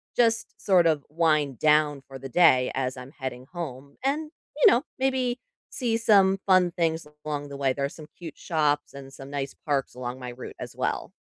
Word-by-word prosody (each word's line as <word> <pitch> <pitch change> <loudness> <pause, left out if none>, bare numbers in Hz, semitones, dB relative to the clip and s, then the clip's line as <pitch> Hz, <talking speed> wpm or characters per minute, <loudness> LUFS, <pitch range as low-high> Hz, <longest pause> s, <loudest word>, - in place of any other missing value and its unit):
just 230 -1 +2
sort 180 -4 +5
of 155 -3 +2
wind 155 -5 +1
down 150 -2 +3
for 135 -1 -9
the 135 +1 -7
day 130 -6 +5
as 130 -1 -1
I'm 130 +4 -10
heading 130 -1 -6
home, 140 -6 -7
and, 300 +3 0 0.3
you 300 - +7
know, 240 +5 +3 0.2
maybe 260 -2 0 0.3
see 235 -3 -1
some 195 -4 +4
fun 185 -2 +4
things 165 -2 -1 0.2
along 145 -1 -3
the 140 - -7
way, 135 -2 +1
there 140 0 -1
are - - -2
some 150 0 -12
cute 165 -4 -9
shops 150 -4 0
and 135 -1 -10
some 135 0 -10
nice 140 -1 -4
parks 140 -3 0
along 125 0 -5
my 125 -1 -6
route 120 +1 -9
as - - -7
well. - - -2
150 Hz, 195 wpm, -26 LUFS, 135-185 Hz, 0.3 s, you